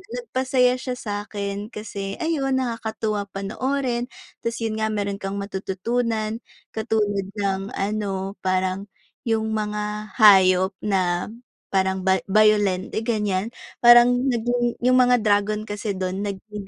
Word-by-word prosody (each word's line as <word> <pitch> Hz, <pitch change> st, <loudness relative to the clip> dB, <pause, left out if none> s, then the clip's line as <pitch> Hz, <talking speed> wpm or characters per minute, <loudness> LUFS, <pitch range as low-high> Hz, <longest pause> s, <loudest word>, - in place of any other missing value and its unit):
nagpasaya 260 Hz, -, +1 dB
siya 255 Hz, -1 st, -5 dB
sa'kin, 205 Hz, 0 st, -4 dB
kasi, 200 Hz, -2 st, -6 dB
ayun 275 Hz, -5 st, 0 dB
nakakatuwa 220 Hz, -3 st, -2 dB
panoorin, 240 Hz, +5 st, -2 dB, 0.4 s
tas 230 Hz, 0 st, -2 dB
yun 225 Hz, -1 st, -2 dB
nga, 220 Hz, 0 st, -1 dB
meron 200 Hz, -1 st, -2 dB
kang 200 Hz, 0 st, -4 dB
matututunan 215 Hz, +3 st, -2 dB, 0.3 s
katulad 210 Hz, -3 st, 0 dB, 0.2 s
ng 195 Hz, 0 st, -1 dB
ano, 195 Hz, -1 st, -3 dB
parang 185 Hz, +1 st, 0 dB, 0.4 s
yung 220 Hz, -1 st, 0 dB
mga 210 Hz, 0 st, -3 dB
hayop, 190 Hz, -2 st, +6 dB
na, 185 Hz, -1 st, 0 dB, 0.4 s
parang 190 Hz, -1 st, +1 dB
ba 190 Hz, 0 st, +3 dB
bayolente 205 Hz, -2 st, +3 dB
ganyan, 210 Hz, -3 st, -1 dB, 0.3 s
parang 245 Hz, +2 st, +6 dB
naging 240 Hz, 0 st, 0 dB
yung 255 Hz, 0 st, +5 dB
mga 245 Hz, -2 st, +4 dB
dragon 210 Hz, 0 st, +1 dB
kasi, 205 Hz, -1 st, -4 dB
dun 185 Hz, +1 st, -3 dB
naging 205 Hz, 0 st, -6 dB
210 Hz, 120 wpm, -23 LUFS, 195-235 Hz, 0.4 s, hayop